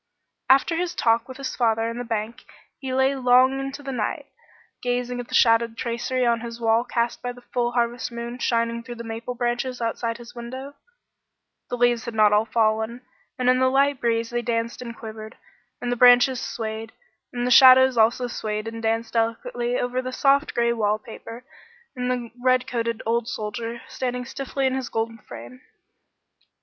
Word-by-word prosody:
After 275 +5 +4
his 355 0 -2
talk 230 -3 +2
with 260 -1 -9
his 275 -1 -5
father 225 -2 +1
in 230 +1 -4
the - - -3
bank 230 +1 -4 0.4
he 265 -2 -5
lay 265 +1 +2
long 255 +1 +4
into 275 +1 -5
the 270 - -4
night, 225 -5 -3 0.6
gazing 245 0 -2
at 245 - -6
the - - -4
shadowed 230 0 +4
tracery 240 +2 -1
on 235 -1 +2
his 235 0 -7
wall 225 0 +2
cast 240 -1 -2
by 245 - -3
the 245 0 -14
full 240 -1 0
harvest 240 0 -1
moon 235 +1 -6
shining 235 -1 0
through 240 0 -8
the 235 - -8
maple 230 +2 -5
branches 245 +1 -2
outside 230 0 -2
his 240 0 -12
window. 260 +4 -7 1.0
The 245 - -3
leaves 240 -1 +2
had 235 -2 -6
not 210 -1 +5
all 210 +1 +3
fallen, 220 +1 0 0.4
and 250 -1 -1
in 255 0 +4
the 260 0 +4
light 275 0 +2
breeze 230 -1 0
they 240 0 -1
danced 230 0 -2
and 235 -2 -7
quivered, 220 0 -9 0.4
and 245 - -3
the - - +1
branches 245 +1 +6
swayed, 220 0 -5 0.4
and 245 0 -2
the 250 - 0
shadows 260 +1 +8
also 230 +2 +3
swayed 215 -2 -4
and 225 0 -6
danced 225 0 -1
delicately 235 +1 -1
over 250 +1 -1
the 255 0 -5
soft 280 +3 +2
gray 235 0 +2
wall 215 -2 +1
paper 230 +2 -11 0.5
and 250 0 -2
the 245 -2 -2
red 255 0 +3
coated 230 -3 -3
old 230 +1 0
soldier 230 +1 -5
standing 250 -1 -3
stiffly 275 +1 -3
in 260 - +2
his 265 -1 -3
gold 225 0 -1 0.2
frame. 120 +2 -10
240 Hz, 185 wpm, -24 LUFS, 230-255 Hz, 1.0 s, shadows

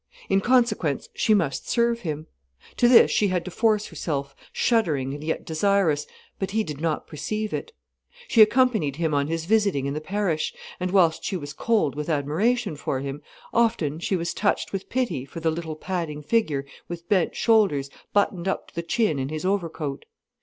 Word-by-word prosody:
In 195 - +3
consequence 230 - +1
she 215 - +3
must 165 -9 -1
serve 235 -1 +2
him. 155 -7 -4 0.5
To 240 - +5
this 240 -1 +7
she 210 - +3
had 180 -3 -1
to 185 - -6
force 215 +1 +2
herself, 140 -3 -4 0.2
shuddering 155 - +1
and 145 +1 -7
yet 160 +1 -2
desirous, 160 -3 +1 0.3
but 195 - -2
he 220 +2 0
did 150 -5 -7
not 165 -2 -1
perceive 215 +8 -4
it. 150 - -4 0.6
She 225 - +5
accompanied 215 - +4
him 160 0 -1
on 140 0 +1
his 165 0 -2
visiting 200 -8 +2
in 140 - -1
the 150 - -3
parish, 175 -2 -1 0.2
and 180 0 -1
whilst 180 -4 +3
she 190 - -2
was 145 -3 -7
cold 210 - +1
with 150 +2 -4
admiration 170 - +1
for 140 -2 -2
him, 140 +1 -5 0.3
often 220 -11 +1
she 190 - 0
was 170 -1 -2
touched 205 0 0
with 195 -1 -4
pity 230 - -1
for 140 +5 -8
the 165 -1 +1
little 160 -1 -4
padding 160 -3 -4
figure 150 -8 +1 0.2
with 170 0 -7
bent 190 -5 +2
shoulders, 195 - +2 0.2
buttoned 195 -3 +1
up 190 - -2
to - - -26
the 170 - -2
chin 170 -3 0
in 135 +1 -2
his 155 +2 -4
overcoat. 165 -7 -2
170 Hz, 185 wpm, -25 LUFS, 150-210 Hz, 0.6 s, this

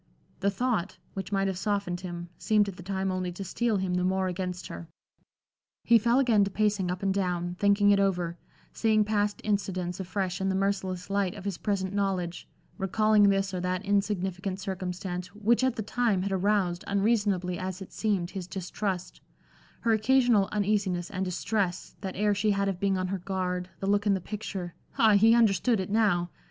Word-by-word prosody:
The 200 - +2
thought, 205 -3 -1 0.2
which 195 +1 -5
might 195 -1 +1
have 190 -2 -2
softened 200 -4 -1
him, 175 -2 -6
seemed 210 -2 +3
at 195 - -5
the 180 - -11
time 190 +1 -2
only 185 -1 -2
to 195 - -6
steel 220 +4 0
him 185 -1 -1
the 180 0 +1
more 190 +1 +1
against 180 0 -4
her. 170 - -8 1.0
He 235 -1 +6
fell 235 +3 +3
again 235 -6 +4
to 200 - 0
pacing 205 -2 0
up 180 +2 -3
and 195 -1 +2
down, 175 -2 -1
thinking 205 0 +4
it 200 - +4
over; 180 -4 0 0.4
seeing 215 -2 +2
past 205 -1 0
incidents 190 -4 -1
afresh 190 0 -2
in 190 - +1
the 190 - 0
merciless 190 -1 -1
light 200 -2 0
of 200 -2 -9
his 195 -4 -3
present 195 -2 -1
knowledge; 190 -4 -2 0.3
recalling 210 +1 +4
this 195 0 +1
or 180 - -2
that 185 +2 -2
insignificant 195 -2 -1
circumstance 185 -1 -4
which 225 +4 +2
at 260 - +2
the 220 - -3
time 215 -3 +1
had 200 - -2
aroused, 190 -2 +1
unreasonably 200 -4 +1
as 185 0 -4
it 195 - -10
seemed, 195 -5 -1
his 185 -1 -6
distrust; 185 0 -4 0.6
her 230 - +3
occasional 225 -2 +3
uneasiness 200 -4 0
and 190 -1 -2
distress, 185 0 -2
that 190 -2 -5
air 210 +1 +2
she 210 +2 +1
had 200 -1 +1
of 190 -2 -2
being 195 -1 +1
on 185 0 -2
her 195 0 -2
guard, 180 -1 -2
the - - -3
look 205 +1 +2
in 200 - +4
the - - -1
picture 195 -3 -5 0.2
ah, 220 -2 +6
he 220 +3 +6
understood 225 0 +3
it 190 +1 -3
now! 200 -6 +2
195 Hz, 190 wpm, -28 LUFS, 185-205 Hz, 1.0 s, He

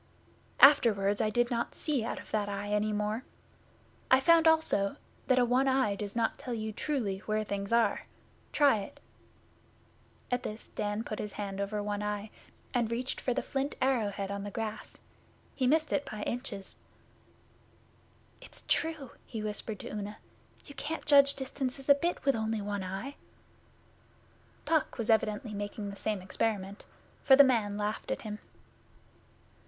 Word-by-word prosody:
'Afterwards 215 -8 +6
I 215 - +2
did 240 +3 +1
not 235 -1 -1
see 285 -7 0
out 230 - -3
of - - -13
that 205 -1 0
eye 200 0 -4
any 210 +1 +1
more. 210 +3 -1 0.9
I 260 - +7
found 330 +3 +5
also 315 -12 +3 0.3
that 255 - +4
a 250 - +5
one 255 +3 +2
eye 260 -6 +2
does 200 +1 -5
not 230 -1 0
tell 245 -2 -4
you 220 -1 -4
truly 220 -9 -2
where 215 0 +1
things 200 0 -4
are. 230 -3 +2 0.4
Try 285 -6 +4
it!' 195 - -9 1.3
At 245 0 +1
this 215 -1 -7
Dan 205 +1 -2
put 215 - -5
his 210 - -4
hand 200 -1 -4
over 205 +1 -2
one 205 0 -2
eye, 210 0 -3 0.4
and 240 -3 +1
reached 245 +3 -3
for 250 - 0
the - - -1
flint 275 +1 -2
arrow 255 -5 +2
head 200 0 -4
on 200 0 -4
the 205 - -4
grass. 220 0 -5 0.6
He 255 - 0
missed 310 +3 +2
it 285 - -1
by 210 -1 -5
inches. 235 -6 -4 1.6
'It's - - -7
true,' 320 -5 0 0.2
he 220 -3 -5
whispered 210 0 -4
to - - -7
Una. 210 0 -5 0.5
'You 285 - -11
can't 315 +3 -4
judge 280 -1 +6
distances 270 0 -4
a - - +11
bit 335 +4 -2
with 275 - +4
only 220 0 -1
one 205 -1 -3
eye.' 195 +10 -5 1.5
Puck 315 -4 +1
was 230 -1 +1
evidently 215 0 +1
making 205 0 -4
the - - -8
same 205 -2 -2
experiment, 200 0 -2 0.4
for 265 - +7
the 280 - +9
man 220 -6 +1
laughed 210 +1 -3
at - - -2
him. 210 -1 -5
220 Hz, 165 wpm, -31 LUFS, 205-265 Hz, 1.6 s, a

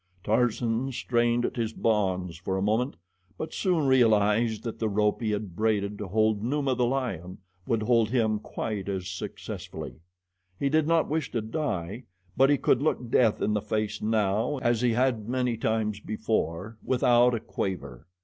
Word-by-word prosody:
Tarzan 115 +3 +1
strained 120 -1 +1
at - - -3
his 115 -1 -1
bonds 95 -7 0
for 95 +2 -3
a - - -1
moment, 115 +6 +1 0.4
but 160 - -5
soon 175 -6 +1
realized 110 -3 +3
that 115 -3 -5
the 110 - 0
rope 105 +3 +1
he 110 - 0
had 105 -4 -3
braided 105 -1 0
to 105 - -4
hold 110 +1 +2
Numa, 135 +3 0
the 125 -1 +1
lion, 100 -9 -3 0.3
would 115 -2 +1
hold 115 -1 +3
him 110 -3 +1
quite 105 -2 -4
as 95 -2 -3
successfully. 95 -3 -7 0.6
He 140 - +1
did 155 +1 +2
not 165 -1 +3
wish 155 -1 -2
to 115 - 0
die; 110 - -3 0.3
but 135 +1 +5
he 145 - +4
could 130 - +2
look 125 -5 -1
death 115 -4 +3
in 105 - +1
the 105 - 0
face 105 0 -2
now 110 +5 +1
as 120 -1 +2
he 120 -2 +2
had 120 -3 0
many 125 -1 0
times 110 -2 -1
before 110 -2 -2
without 125 -1 +4
a - - -2
quaver. 70 - -5
110 Hz, 170 wpm, -27 LUFS, 105-125 Hz, 0.6 s, but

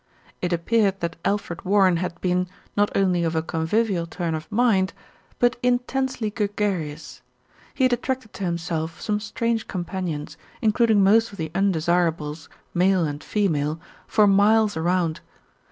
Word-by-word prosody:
It 180 - -1
appeared 195 +3 +1
that 170 -1 -2
Alfred 200 -4 -2
Warren 190 -2 +4
had 175 0 -4
been, 180 0 +1 0.3
not 205 0 +3
only 185 -3 +2
of 165 0 -1
a 160 - +1
convivial 170 +3 0
turn 170 -1 -3
of 160 +6 -6
mind, 210 -4 +2 0.4
but 245 0 +2
intensely 250 -2 0
gregarious. 200 -8 -3 0.5
He 275 - 0
had 255 -1 +4
attracted 250 -2 -3
to 195 - -6
himself 170 -2 -3
some 210 -1 -1
strange 225 +2 -2
companions, 175 -4 -4 0.2
including 220 -2 +3
most 225 +3 +4
of 200 - -11
the 160 -1 -4
undesirables, 165 -4 0 0.2
male 185 -1 +3
and 145 0 -5
female, 160 -7 0 0.3
for 215 - +4
miles 205 +2 +4
around. 170 0 0
190 Hz, 140 wpm, -24 LUFS, 165-215 Hz, 0.5 s, Warren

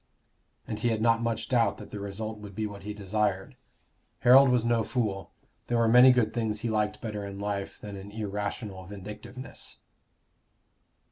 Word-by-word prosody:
And 110 - -4
he 120 - +1
had 115 -2 +1
not 115 +1 +3
much 115 -1 -1
doubt 120 -3 +2
that - - -11
the 105 - -5
result 105 +2 -5
would 105 -2 -10
be 110 0 -1
what 100 -1 -7
he 105 +2 -5
desired. 100 -1 -1 0.7
Harold 130 +2 +8
was 125 -2 +2
no 115 -1 +2
fool: 105 -7 -2 0.4
there 120 - +1
were 115 -1 +3
many 125 +3 +8
good 120 -4 +2
things 110 -3 -1
he 115 - -1
liked 105 0 0
better 105 -3 -4
in 100 0 -6
life 100 -1 -3
than 105 -1 -7
an 100 +1 -8
irrational 100 -1 -4
vindictiveness. 105 +6 -8
105 Hz, 175 wpm, -28 LUFS, 100-115 Hz, 0.7 s, Harold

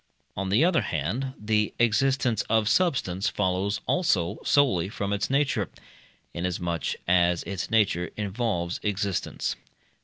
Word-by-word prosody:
On 95 0 -3
the 110 - +4
other 175 -2 +3
hand, 115 - -2
the 105 0 0
existence 120 0 +2
of 110 -1 +2
substance 110 - +1
follows 100 +1 -1
also 95 - +1
solely 95 -12 +3
from 100 -1 -3
its 100 - -1
nature, 135 - +1 0.6
inasmuch 85 -1 -2
as 90 -1 +3
its 95 +1 -4
nature 100 -6 +2
involves 100 -4 -2
existence. 100 -2 -2
100 Hz, 120 wpm, -26 LUFS, 90-120 Hz, 0.6 s, the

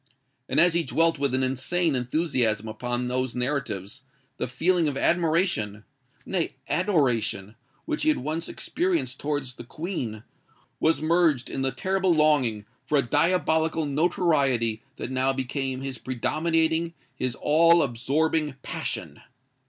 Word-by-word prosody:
And - - +2
as 175 +1 +6
he 170 - +2
dwelt 165 -1 +2
with 140 -2 +1
an 130 - +1
insane 140 +5 0
enthusiasm 125 -5 0
upon 120 +3 -3
those 130 0 -1
narratives, 125 -4 -3 0.4
the - - -2
feeling 165 +6 +1
of 140 -2 -1
admiration—nay, 150 - -1
adoration—which 125 - -1
he 310 - +3
had 305 - +3
once 160 +2 -3
experienced 160 -9 -1
towards 145 -3 -3
the - - -10
Queen, 120 - -5 0.6
was 160 0 +2
merged 160 -6 +2
in 135 - -3
the 135 0 +1
terrible 190 0 +1
longing 135 -9 +2 0.2
for 150 - +1
a 140 - +3
diabolical 160 +2 +1
notoriety 140 -7 +1
that - - -6
now 130 +1 +1
became 130 0 -3
his 135 -3 -5
predominating—his 160 0 -1
all 165 +3 +4
absorbing 145 +4 0
passion! - - -5
140 Hz, 125 wpm, -26 LUFS, 125-165 Hz, 0.6 s, as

